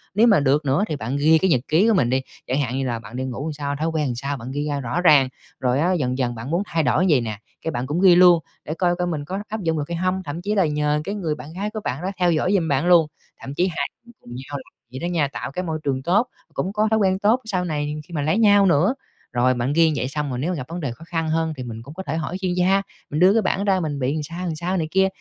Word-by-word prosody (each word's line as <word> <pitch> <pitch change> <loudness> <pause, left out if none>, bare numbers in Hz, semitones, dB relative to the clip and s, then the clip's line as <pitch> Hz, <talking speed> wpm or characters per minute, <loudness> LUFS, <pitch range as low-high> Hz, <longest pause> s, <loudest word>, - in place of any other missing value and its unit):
Nếu 225 +3 +5
mà 205 -7 +5
được 145 +2 +2
nữa 140 +8 +2
thì 155 - -2
bạn 130 +1 -3
ghi 155 +3 +5
cái 190 +2 +1
nhật 130 -7 +3
ký 175 +8 +3
của 225 - +4
mình 180 - +2
đi, 130 +1 +1 0.3
chẳng 130 +3 0
hạn 130 -1 -2
như 135 - -1
là 120 -2 -2
bạn 115 +1 -11
đi 130 - -2
ngủ 130 +1 -4
làm 160 - -3
sao, 145 -1 -3
thói 155 +3 -2
quen 160 -2 0
làm 125 - -2
sao, 140 +3 -3
bạn 120 +2 -7
ghi 145 +2 -2
ra 145 -1 -1
rõ 135 +7 -2
ràng, 145 -7 +6 0.3
rồi 125 +1 +1
á 175 +4 +2
dần 130 -7 -1
dần 120 -2 -1
bạn 115 +5 -6
muốn 175 +4 +1
thay 165 -5 0
đổi 130 +7 +2
vầy 145 -6 +4
nè, 110 -3 -4 0.2
cái 160 - -2
bạn 125 -1 -3
cũng 160 +5 -1
ghi 185 -2 +7
luôn 175 -1 +7 0.3
để 155 - -3
coi 175 +1 +1
coi 180 0 -1
mình 155 -4 -3
có 190 +6 -4
áp 220 -1 -4
dụng 165 -2 0
được 150 - -1
hay 170 - -2
hông, 185 +2 -1
thậm 160 +1 -5
chí 210 +3 -1
là 195 -4 +3
nhờ 150 0 0
cái 200 +5 -4
người 165 -7 -2
bạn 155 +1 -10
gái 200 +4 -3
của 215 0 -5
bạn 130 +4 -3
đó 185 - -1
theo 180 -1 +3
dõi 170 +4 +1
giùm 180 -5 +2
bạn 140 +1 +1
luôn, 170 -3 +6 0.3
thậm 135 - -7
chí 180 +6 +1
hai 175 - -2 0.2
người 240 - -16
cùng - - -16
nhau 135 +3 -6
làm 130 - -13 0.2
vậy 130 - -6
đó 175 +1 -3
nha, 155 -4 +2
tạo 135 - -6
cái 180 +6 -3
môi 160 -3 -3
trường 135 -2 -1
tốt, 205 - +2 0.3
cũng 190 - -2
có 215 +1 +2
thói 220 - +3
quen 190 -1 +2
tốt 215 +5 +3
sau 185 -5 -1
này 150 -2 -2
khi 175 - -13
mà 150 - -1
lấy 155 +8 +1
nhau 205 -3 +5
nữa. 180 - +3 0.4
Rồi 125 +1 +3
bạn 125 +3 -1
ghi 160 0 +4
vậy 130 - -1
xong 145 +1 -3
rồi 125 -2 -3
nếu 170 +7 -1
gặp 135 -7 -5
vấn 170 +2 -5
đề 140 -7 -3
khó 120 +8 -11
khăn 165 -2 -2
hơn 160 0 0
thì 130 - -5
mình 115 -2 -7
cũng 140 - -11
có 190 +3 -6
thể 160 -2 -3
hỏi 165 +3 -3
chuyên 185 -1 0
gia, 185 +2 +3 0.3
mình 150 - -2
đưa 185 +3 +6
cái 225 - +3
bảng 195 0 0
ra 195 -2 +2
mình 150 -5 -3
bị 130 +2 0
làm 155 -1 -2
sao, 170 +4 -6
làm 165 -3 -2
sao 180 +4 -2
này 160 -3 -1
kia 190 0 +4
160 Hz, 315 wpm, -22 LUFS, 140-180 Hz, 0.4 s, ghi